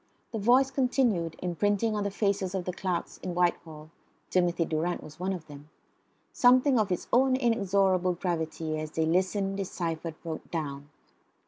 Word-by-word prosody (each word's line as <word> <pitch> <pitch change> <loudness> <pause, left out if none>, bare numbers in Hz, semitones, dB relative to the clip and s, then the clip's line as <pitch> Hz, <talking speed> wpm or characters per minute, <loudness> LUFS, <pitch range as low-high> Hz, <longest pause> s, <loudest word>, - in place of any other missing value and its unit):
The 225 - -3
voice 255 +6 +4
continued, 245 - +1
imprinting 205 +5 +1
on 205 - -1
the 200 - -1
faces 200 -2 -1
of 185 -2 -2
the 180 - -3
clerks 180 -1 -3
in 180 -2 -5
Whitehall 160 -3 -1 0.4
(Timothy 175 -2 +2
Durrant 165 +3 -2
was 155 +1 -12
one 185 +2 -1
of 180 -4 -5
them) 145 0 -12 0.6
something 255 0 +5
of 205 -3 0
its 180 - -2
own 260 +1 +5
inexorable 195 -6 +2
gravity, 160 -3 -2
as 155 0 -4
they 160 +1 0
listened, 190 +3 0
deciphered, 165 -4 -3
wrote 160 -1 -6
down. 145 -3 -4
180 Hz, 155 wpm, -28 LUFS, 165-205 Hz, 0.6 s, something